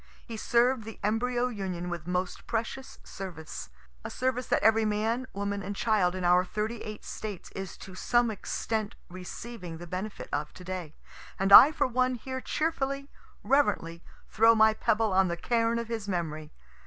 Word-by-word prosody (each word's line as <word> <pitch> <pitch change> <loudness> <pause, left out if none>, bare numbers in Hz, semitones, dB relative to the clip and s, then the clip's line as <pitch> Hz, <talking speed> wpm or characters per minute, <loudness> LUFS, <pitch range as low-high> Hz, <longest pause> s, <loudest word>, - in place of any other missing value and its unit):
He 230 - -7
served 240 +2 +2
the 225 0 -9
embryo 240 +4 +1
Union 190 -6 -4
with 175 -2 -5
most 180 0 -3
precious 235 +4 -4
service 165 - -8 0.3
a - - -5
service 255 -1 -1
that - - +1
every 220 +1 +5
man, 220 +4 0
woman 200 0 -3
and 200 +1 -5
child 195 -5 +2
in 185 - -4
our 180 +1 +5
thirty 215 +4 -3
eight 215 -1 -7
States 210 -4 -7
is 195 -2 -7
to 190 - -11
some 240 +4 +2
extent 215 +1 -3
receiving 180 0 -8
the 175 - -9
benefit 185 +4 -5
of 150 +1 -2
to 185 - -11
day 180 -4 -6 0.4
and 195 +1 +2
I 280 - +12
for 290 -2 +1
one 255 0 +1
here 260 +2 -5
cheerfully, 275 -3 -2 0.3
reverently 170 -12 +1 0.3
throw 225 +1 +5
my 220 0 +6
pebble 220 -2 +1
on 190 0 +4
the 170 0 -2
cairn 230 +3 +1
of 235 -1 -3
his 225 -3 -4
memory. 155 -5 -3
215 Hz, 170 wpm, -29 LUFS, 185-235 Hz, 0.4 s, I